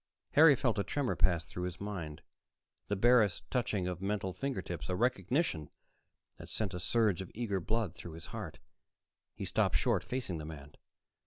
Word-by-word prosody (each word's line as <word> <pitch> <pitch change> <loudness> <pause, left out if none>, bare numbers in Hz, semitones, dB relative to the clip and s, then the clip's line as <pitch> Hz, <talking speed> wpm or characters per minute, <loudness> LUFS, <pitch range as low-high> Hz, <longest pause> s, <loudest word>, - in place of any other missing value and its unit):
Harry 150 -1 +8
felt 120 -4 +1
a - - +2
tremor 140 +1 -1
pass 85 -3 +3
through 90 - -5
his 90 0 -5
mind, 90 -7 -5 0.6
the 105 - 0
barest 110 -2 +4
touching 105 -7 0
of 90 0 -4
mental 95 -1 -1
fingertips, 95 - -4
a 90 - +1
recognition 115 - +1 0.7
that - - -10
sent 105 -4 -2
a 90 - -3
surge 105 -1 +2
of 95 - -7
eager 105 -4 -1
blood 110 0 -1
through 85 -1 -9
his 80 0 -9
heart. - - -5 0.8
He - - -4
stopped - - +1
short, - - +2
facing 125 -10 -3
the - - -5
man. 75 -2 -9
95 Hz, 170 wpm, -33 LUFS, 90-115 Hz, 0.8 s, Harry